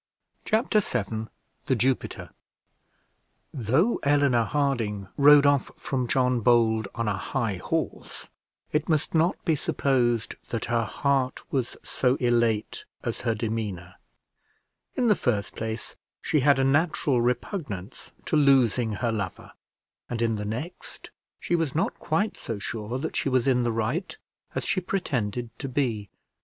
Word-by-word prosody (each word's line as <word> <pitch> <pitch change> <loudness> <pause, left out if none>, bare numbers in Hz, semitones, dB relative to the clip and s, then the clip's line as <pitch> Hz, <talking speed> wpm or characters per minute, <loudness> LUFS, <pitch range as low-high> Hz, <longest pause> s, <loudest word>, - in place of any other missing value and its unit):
Chapter 220 0 +2
VII 110 - -2 0.4
THE 130 - +3
JUPITER 130 +2 -1 1.2
Though 135 - +2
Eleanor 140 -5 +3
Harding 115 -9 -1
rode 145 0 +7
off 140 -1 +3
from 130 -3 -2
John 125 0 +2
Bold 110 -2 +3
on 115 -1 -1
a 105 - +1
high 110 -2 -2
horse, - - -4 0.4
it 150 - 0
must 155 -2 +1
not 165 +2 +1
be 165 -4 +3
supposed 120 -6 0
that 115 - -2
her 115 -1 +1
heart 135 +1 0
was 130 -4 -1
so 125 -1 +1
elate 120 -4 +1 0.2
as - - -3
her 115 -2 0
demeanour. 105 -6 -3 1.0
In 250 - +2
the 210 - +5
first 110 - -1
place, 110 0 -4 0.2
she 155 - +1
had 140 +1 +4
a 135 - +2
natural 145 -2 +2
repugnance 120 - -3
to - - 0
losing 130 -6 +4
her 115 +2 -1
lover; 100 -4 -4 0.6
and 120 - -3
in 115 -1 +1
the 105 0 -4
next, 125 - -6 0.3
she 175 - 0
was 165 -5 -1
not 165 - +1
quite 200 +7 0
so 115 - -5
sure 110 +3 -4
that 160 +4 -4
she - - 0
was 130 -2 +2
in 130 -2 +3
the 120 -1 +1
right 115 - -2 0.4
as - - -1
she 185 - 0
pretended 125 - -2
to 135 - -4
be. 120 -7 -1
125 Hz, 145 wpm, -26 LUFS, 110-145 Hz, 1.2 s, rode